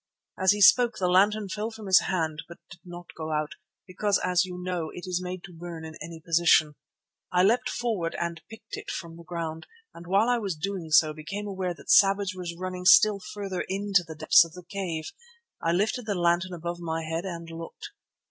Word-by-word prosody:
As 190 -1 +3
he 205 0 -1
spoke 235 +3 +6
the 185 - 0
lantern 200 +3 +3
fell 210 +3 -3
from 220 -2 -10
his 190 -1 +6
hand, 160 -5 -2
but 170 - -11
did 185 - -12
not 175 -1 -11
go 160 -1 -5
out, 150 -1 -1 0.3
because, 200 +2 0
as 180 0 +1
you 180 -1 -7
know, 180 -3 -3
it 180 - -8
is 180 -1 -2
made 180 0 -6
to 180 - -11
burn 165 -1 -8
in 160 - -8
any 165 -1 -8
position. 165 -2 +3 0.6
I 180 0 +3
leapt 225 +6 +2
forward 210 -9 -2
and 170 -1 -3
picked 220 0 -9
it - - -8
from 165 -2 -6
the 170 - -12
ground, 165 -2 -5 0.3
and 170 - -12
while 200 +5 +3
I 245 -1 +2
was 195 -6 -3
doing 180 0 -4
so 155 0 +5
became 155 +7 -6
aware 190 -3 -3
that - - -4
Savage 195 0 +5
was 175 -2 -6
running 185 0 -5
still 205 +2 +7
farther 195 -1 -5
into 195 -1 +1
the 160 -2 -9
depths 155 +2 +6
of 165 -1 -11
the 180 - -11
cave. 175 -6 -4 0.5
I 165 - +1
lifted 215 +6 0
the 205 - 0
lantern 175 +1 +1
above 170 +1 -5
my 165 -1 -3
head 165 +2 -3
and 170 -3 -6
looked. 165 - -9
180 Hz, 210 wpm, -27 LUFS, 165-195 Hz, 0.6 s, still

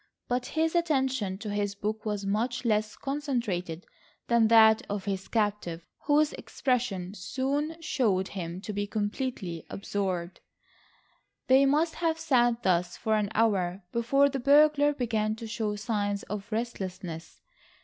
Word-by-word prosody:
But 245 0 -1
his 320 0 +2
attention 265 - +1
to 210 0 -5
his 205 -1 -1
book 215 +2 -3
was 205 -2 -2
much 235 +6 -1
less 215 -1 +1
concentrated 235 - -3 0.4
than 235 -2 +5
that 220 -1 +7
of 200 -1 -3
his 195 -1 -3
captive, 205 -6 -1 0.2
whose 300 +1 +3
expression 220 -8 -2
soon 280 - -2
showed 205 - +1
him 175 -1 -5
to 210 +1 -5
be 205 0 -2
completely 205 - -3
absorbed. 190 -3 -3 1.1
They 265 +1 +5
must 310 +4 +2
have 325 -1 +1
sat 240 -5 +2
thus 175 -1 +1
for 220 -2 0
an 210 -2 +1
hour, 195 -4 +1
before 275 +5 +3
the 275 -1 -2
burglar 290 +2 +5
began 220 -4 0
to 225 +1 -8
show 215 -1 -2
signs 205 -1 -2
of 210 +2 -6
restlessness. 185 -7 -5
220 Hz, 140 wpm, -28 LUFS, 195-260 Hz, 1.1 s, that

